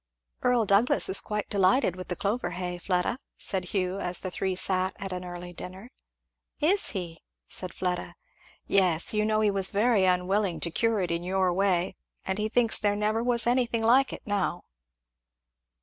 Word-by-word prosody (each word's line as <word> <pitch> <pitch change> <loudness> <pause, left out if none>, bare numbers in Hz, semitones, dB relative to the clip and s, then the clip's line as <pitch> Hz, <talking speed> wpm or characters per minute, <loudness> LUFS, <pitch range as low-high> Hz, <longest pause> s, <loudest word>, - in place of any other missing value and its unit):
"Earl 245 -3 +2
Douglass 200 +5 +4
is 190 - +5
quite 210 -1 -3
delighted 195 +1 +2
with 185 0 -8
the 180 - -3
clover 210 +7 -2
hay, 180 -1 -5
Fleda," 180 +7 -1 0.2
said 190 -2 -2
Hugh, 185 0 -2
as 180 -2 0
the 185 - -5
three 190 0 -2
sat 185 0 +1
at 195 -1 -7
an 180 0 -5
early 175 0 -8
dinner. 190 +7 -9 0.7
"Is 375 +7 +2
he?" 170 -3 -6 0.3
said 185 -2 -3
Fleda. 180 -1 -3 0.5
"Yes, 180 -3 +3
you 210 0 +1
know 215 0 +1
he 210 -1 +3
was 195 -1 +4
very 210 -1 +2
unwilling 185 +1 +1
to 170 - -2
cure 225 +3 +1
it 175 -2 -2
in 170 0 -1
your 185 0 0
way 185 -1 0 0.3
and 190 +2 -2
he 215 +1 -1
thinks 230 0 +2
there 205 -1 +1
never 215 +2 0
was 235 -1 +1
anything 240 -2 +1
like 255 +4 +4
it - - -8
now." 200 -4 -1
195 Hz, 180 wpm, -27 LUFS, 180-215 Hz, 0.7 s, is